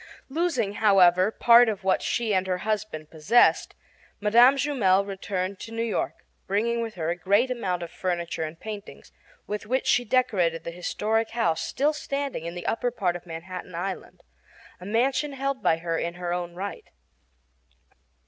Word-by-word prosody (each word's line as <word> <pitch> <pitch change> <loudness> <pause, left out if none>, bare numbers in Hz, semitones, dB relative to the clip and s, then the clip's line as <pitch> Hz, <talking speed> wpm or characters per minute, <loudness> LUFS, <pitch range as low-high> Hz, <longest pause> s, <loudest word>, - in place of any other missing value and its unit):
Losing, 270 - 0
however, 185 -2 +5
part 235 +1 +6
of 205 -3 -4
what 190 0 +2
she 230 -3 -1
and 190 0 +1
her 185 -1 0
husband 210 -8 -3
possessed, 165 +10 +3 0.4
Mme. 235 +6 +6
Jumel 225 -9 +2
returned 195 -1 -4
to 225 - -8
New 230 0 -2
York, 230 -3 -3 0.2
bringing 235 +4 0
with 225 -1 -5
her 165 -2 -2
a - - -1
great 200 +8 +2
amount 185 -8 -2
of 170 - -8
furniture 175 -2 -3
and 160 +1 -5
paintings, 210 -2 -9 0.3
with 210 0 -5
which 260 +3 0
she 245 - +3
decorated 200 -10 +1
the 170 - -5
historic 215 +6 -1
house 200 -9 0
still 290 +3 0
standing 280 - -4
in 170 - -6
the 175 - -7
upper 245 +2 0
part 190 -7 -1
of 175 0 -9
Manhattan 175 +2 -7
Island 190 +3 -5 0.6
a 180 - -9
mansion 265 +6 +1
held 275 0 -2
by 160 - +3
her 165 0 -2
in 170 0 -3
her 175 -1 -3
own 175 -1 -4
right. 200 - -6
200 Hz, 165 wpm, -26 LUFS, 175-235 Hz, 0.6 s, part